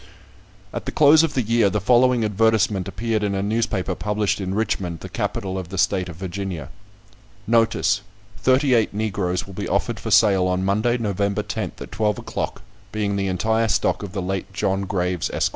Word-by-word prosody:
At - - -5
the - - -1
close 155 +1 +6
of 165 -3 -1
the 130 - +1
year, 115 -1 +3
the 105 - -1
following 120 +2 +3
advertisement 105 -2 +2
appeared 110 +3 -2
in 100 -1 -1
a 95 - -1
newspaper 100 -3 -1
published 105 +1 -1
in 95 0 -3
Richmond, 90 -6 -2
the - - -6
capital 95 -1 -3
of 90 -2 -7
the 95 - -6
state 95 -2 +1
of 85 - -8
Virginia: 90 -4 -5 0.8
"Notice: 115 -2 +2 0.4
Thirty 130 +1 +3
eight 110 -3 +2
Negroes 95 -4 -1
will 95 - -11
be - - -4
offered - - -1
for - - -5
sale 95 -4 +4
on 90 +1 0
Monday, 110 +5 +1
November 100 -2 -1
10th, - - -5
at - - -8
twelve 105 -1 0
o'clock, - - -4 0.3
being 105 -2 -1
the 100 -1 -1
entire 110 +5 +1
stock 105 - +1
of 100 -2 -7
the 95 -3 -3
late 95 0 -3
John 95 +1 0
Graves, 90 -2 -1
Esq. - - 0
100 Hz, 190 wpm, -22 LUFS, 95-110 Hz, 0.8 s, close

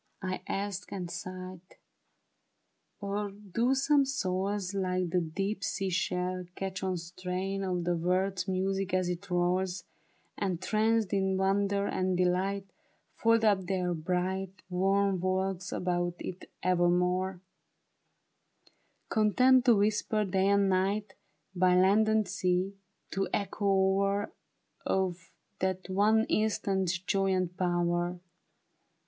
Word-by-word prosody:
" - - -44
I - - -5
asked 200 -1 -3
and 180 -3 -4
sighed; 185 +1 -7 0.8
" - - -48
or 200 +1 -2
do 210 +6 -1
some 280 +1 +4
souls. 195 -5 -2
Like 185 -2 -1
the 180 - +2
deep 195 +5 -3
sea 195 -1 -1
shell, 180 0 -1
catch 190 -1 -4
one 185 -1 -1
strain 185 +3 -4
Of 180 -2 -1
the 175 0 +1
world's 185 +2 0
music 190 0 -1
as 185 -1 +1
it 180 +3 -5
rolls, 180 +1 0 0.6
And 185 -4 -1
tranced 215 +1 +1
in 190 -1 +1
wonder 200 +1 +1
and 185 -2 0
delight, 185 +2 +1 0.5
Fold 230 0 +3
up 195 -4 +2
their 180 -2 0
bright 185 +2 -2
Warm 195 +1 +2
walls 185 0 -1
about 175 -1 -1
it 185 0 -7
evermore; 180 +1 +2 1.7
Content 250 +4 +4
to 240 -3 +6
whisper 210 +1 +1
day 190 0 +1
and 200 0 +4
night. 195 +3 0 0.4
By 180 0 +4
land 200 +4 +4
and 220 -2 +2
sea, 185 0 0 0.4
the 195 0 -1
echo 200 0 -2
o'er 195 +1 +2 0.5
Of 180 -2 -1 0.3
that 185 0 -2
one 215 +3 +3
instant's 195 -4 0
joy 195 +2 0
and 180 -1 -1
power." 175 0 0
190 Hz, 125 wpm, -30 LUFS, 180-200 Hz, 1.7 s, to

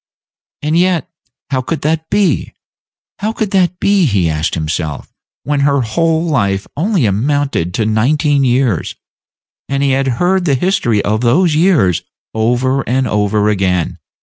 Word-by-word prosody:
And 155 +2 0
yet, 175 -1 +1 0.4
how 130 -1 +1
could 155 +6 -4
that 160 +1 -1
be? 200 -8 0 0.7
How 215 +2 -1
could 220 -3 -3
that 180 -2 +1
be, 200 -4 +3
he 95 - +1
asked 75 +1 -2
himself, 80 -2 -4 0.3
when 145 0 -1
her 140 -1 +2
whole 160 +8 0
life 100 - 0
only 180 - +1
amounted 120 - 0
to 110 - 0
nineteen 140 +6 +1
years, 125 -6 0 0.7
and 140 0 0
he 140 - +2
had 135 +1 +1
heard 180 +1 +1
the 140 -5 +2
history 125 - 0
of 110 +2 0
those 155 +8 +3
years 155 - +2 0.3
over 125 +4 +1
and 130 +1 +1
over 105 0 +1
again? 95 -4 -1
135 Hz, 150 wpm, -15 LUFS, 105-165 Hz, 0.7 s, be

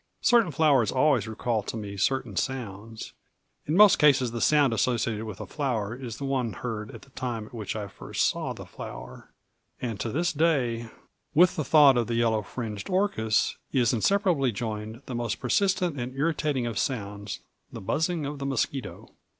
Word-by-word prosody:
Certain 235 -6 +5
flowers 140 -7 +3
always 135 -2 +2
recall 110 0 -1
to 110 - -6
me 100 -2 -6
certain 120 +1 0
sounds; 110 -2 -4 0.5
in 155 +4 +1
most 210 -1 +7
cases 135 -5 +4
the 115 -1 -4
sound 145 -5 +4
associated 115 -2 0
with 105 -3 -7
a - - -5
flower 115 -8 -2
is 125 -3 -7
the 140 - -5
one 130 -5 -1
heard 105 0 -5
at - - -11
the 135 - -19
time 120 -4 -4
at 115 - -16
which 110 -4 -4
I 105 -2 -4
first - - -2
saw - - -1
the - - -8
flower; - - -9 0.5
and 115 -5 -4
to 115 - -2
this 170 +8 0
day, 130 -8 +1 0.5
with 175 +3 +6
the 155 - -1
thought 140 -2 +6
of 120 - +1
the 120 - -1
yellow 115 -2 +2
fringed 105 - -6
orchis 185 - +1
is 125 -4 +2
inseparably 165 - +2
joined 110 +2 -5
that 130 - -6
most 120 -2 -1
persistent 180 +2 +1
and 125 +2 -5
irritating 150 -3 0
of 115 -3 -2
sounds, 100 -5 -3 0.3
the - - -7
buzzing 160 - -1
of 145 0 -5
the 140 - -4
mosquito. 135 0 -3
125 Hz, 180 wpm, -27 LUFS, 110-145 Hz, 0.5 s, most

